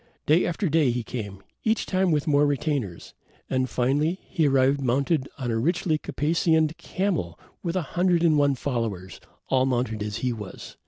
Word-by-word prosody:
Day 160 +4 +4
after 180 +3 -1
day 155 -3 +3
he 120 0 -1
came, 105 -5 -6 0.2
each 220 0 +1
time 185 -1 +1
with 150 -2 +1
more 145 -1 +3
retainers, 140 - -2 0.4
and, 130 -1 +1
finally, 145 +8 +1
he 160 -3 0
arrived 135 +1 +3
mounted 135 +3 +1
on 125 -4 -2
a 115 - 0
richly 160 +3 +1
caparisoned 160 +1 +1
camel 170 - -2 0.2
with 170 -1 -3
a 185 - 0
hundred 175 -1 +2
and 160 -2 +4
one 145 -1 +3
followers, 115 -9 -3 0.3
all 130 0 +3
mounted 120 -4 -1
as 105 -1 -3
he 125 - +1
was. 105 -4 -9
140 Hz, 170 wpm, -25 LUFS, 120-165 Hz, 0.4 s, Day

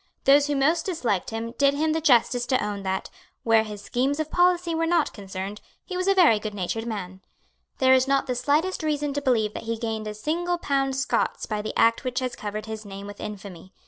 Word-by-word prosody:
Those 280 +1 +5
who 290 - 0
most 315 +6 +2
disliked 245 - -1
him 225 +1 -4
did 280 0 +4
him 310 +2 +1
the 320 - -1
justice 245 -3 +3
to 255 -4 +1
own 205 -1 -4
that, 190 0 -3 0.3
where 225 -1 +4
his 210 -2 -8
schemes 270 +7 0
of 310 0 -3
policy 355 -1 +2
were 330 0 0
not 335 -2 +2
concerned, 195 0 -6 0.2
he 370 - -6
was 365 +1 -1
a 390 - +4
very 320 - +5
goodnatured 210 +2 -4
man. 190 -4 -5 0.6
There 260 0 +5
is 260 0 +4
not 275 0 +2
the 255 - -1
slightest 295 +9 0
reason 295 -2 -1
to 285 - -2
believe 225 -6 +1
that - - -7
he 230 - -1
gained 220 -1 -3
a 210 - -5
single 345 +9 -1
pound 275 -4 0
Scots 270 0 -1
by 210 -1 -3
the 215 - -5
act 230 +3 +3
which 250 -1 -3
has 255 -1 -1
covered 215 0 -5
his 220 -1 -6
name 200 -1 -8
with 205 0 -9
infamy. 195 -3 -8
250 Hz, 220 wpm, -25 LUFS, 210-295 Hz, 0.6 s, Those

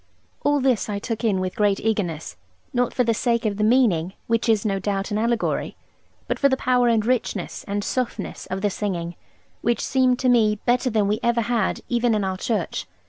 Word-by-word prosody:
All 290 0 +3
this 255 -5 +1
I 205 - -2
took 225 +3 -4
in 205 -5 +2
with 185 0 -3
great 205 -3 +2
eagerness, 175 - -2 0.4
not 245 -1 +1
for 250 - +1
the 230 -1 +2
sake 235 +1 0
of 205 -2 0
the 210 - 0
meaning 210 -7 +3
(which 230 0 0
is 220 -1 +2
no 195 -2 0
doubt 195 0 -2
an 210 - 0
allegory), 235 0 -1 0.5
but - - -2
for 280 - +4
the 265 - +1
power 250 -1 +2
and 225 -2 +2
richness, 230 -6 -1
and 205 0 -2
softness 250 +2 -3
of 190 +1 -4
the 205 0 +1
singing, 175 -4 -3 0.5
which 235 +1 +1
seemed 255 -1 +2
to 260 - -1
me 225 -4 +4
better 250 +1 +2
than 215 -3 +1
we 210 +2 0
ever 235 0 +2
had 230 -3 0
even 240 -1 +1
in 205 -2 0
Oare 190 0 -2
church. 185 - -2
220 Hz, 205 wpm, -23 LUFS, 200-245 Hz, 0.5 s, for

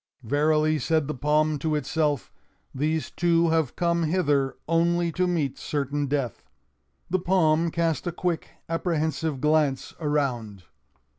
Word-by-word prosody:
"Verily," 155 +4 +2
said 160 -3 +1
the 150 - -2
palm 150 +2 +1
to 155 +2 0
itself, 150 -1 -1 0.4
"these 150 +1 -1
two 170 -1 +2
have 160 -5 +1
come 170 -1 +1
hither 145 -5 +1
only 170 +1 +2
to 180 +3 0
meet 160 -7 -1
certain 145 0 -2
death." 135 -4 -3 0.6
The 185 - +2
palm 170 -3 +2
cast 165 +1 -1
a - - 0
quick, 170 0 -2 0.2
apprehensive 160 -3 -1
glance 150 -2 +1
around. 125 - -1
155 Hz, 130 wpm, -26 LUFS, 145-165 Hz, 0.6 s, Verily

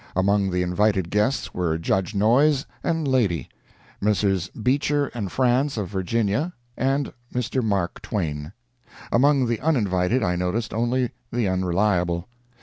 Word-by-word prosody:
Among 100 +1 +2
the 90 0 0
invited 95 0 +1
guests 105 +4 0
were 85 -3 0
Judge 95 +5 -1
Noyes 130 +8 +3 0.2
and 165 -3 0
lady, 110 - +1 0.5
Messrs. 100 -3 +1
Beecher 140 +6 0
and 105 -7 -4
Franz, 130 +2 +1
of 100 -4 -2
Virginia, 105 - 0 0.2
and 135 +1 0 0.2
Mr. 125 +1 -1
Mark 100 -5 -1
Twain; 75 -6 -3 0.6
among 135 +2 +4
the 115 -2 -1
uninvited 110 - +1
I 90 -2 +1
noticed 90 +6 -2
only 120 +2 0 0.2
the 120 -3 0
Unreliable. 90 -1 +1
105 Hz, 130 wpm, -24 LUFS, 90-130 Hz, 0.6 s, among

